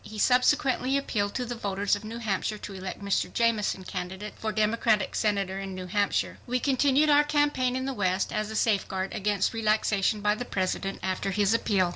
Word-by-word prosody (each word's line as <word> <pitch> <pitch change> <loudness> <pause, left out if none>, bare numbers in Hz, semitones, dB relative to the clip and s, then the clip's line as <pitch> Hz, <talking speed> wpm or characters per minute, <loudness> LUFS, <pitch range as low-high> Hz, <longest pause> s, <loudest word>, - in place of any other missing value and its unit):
He 215 +1 -9
subsequently 255 +2 +3
appealed 205 -7 -2
to 250 - -1
the 240 - -4
voters 200 -3 0
of 205 - -8
New 220 +2 -6
Hampshire 215 -1 -2
to 205 - -8
elect 190 +1 -6
Mr. 200 -1 0
Jameson, 220 -5 +1
candidate 190 +2 -6
for 220 - -3
Democratic 215 -1 +1
Senator 200 -2 0
in 195 -1 -6
New 185 0 -6
Hampshire. 200 +2 0
We 250 +1 0
continued 280 +3 +3
our 290 0 +6
campaign 290 -4 +1
in 260 0 -2
the 270 - -2
West 185 -4 0
as 215 -1 -1
a 220 - -6
safeguard 195 -3 0
against 200 0 0
relaxation 215 -2 +1
by 210 0 +3
the 215 - -4
President 195 -2 -2
after 190 +1 -1
his 200 +2 +2
appeal. 195 -5 +2
210 Hz, 190 wpm, -27 LUFS, 195-240 Hz, -, our